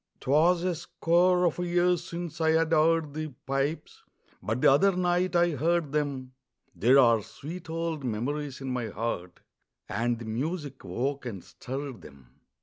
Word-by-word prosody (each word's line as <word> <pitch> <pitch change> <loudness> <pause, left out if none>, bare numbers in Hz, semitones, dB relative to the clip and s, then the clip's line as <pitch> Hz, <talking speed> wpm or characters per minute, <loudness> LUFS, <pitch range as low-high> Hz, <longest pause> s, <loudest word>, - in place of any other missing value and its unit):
'Twas 165 +6 +3
a 185 -1 +1
score 175 +2 +2
of 170 0 0
years 175 0 +1
since 170 -2 -6
I'd 160 0 +3
heard 160 -1 +3
the 155 +1 -3 0.2
pipes, 135 +4 -2 0.4
But 110 +3 -2
the - - +6
other 185 +8 +4
night 180 0 +1
I 175 0 +4
heard 160 +1 0
them; 140 -4 -2 0.4
There 120 +10 +4
are 115 -4 +5
sweet 165 - -9
old 165 -2 -3
memories 135 +5 -3
in 135 - -4
my 125 -2 -2
heart, 105 -5 -4 0.5
And 120 +3 -1
the 115 - -8
music 140 +5 -4
woke 135 +1 -3
and 100 -7 -6
stirred 135 0 -7
them. 65 -4 -15
150 Hz, 150 wpm, -28 LUFS, 130-170 Hz, 0.5 s, the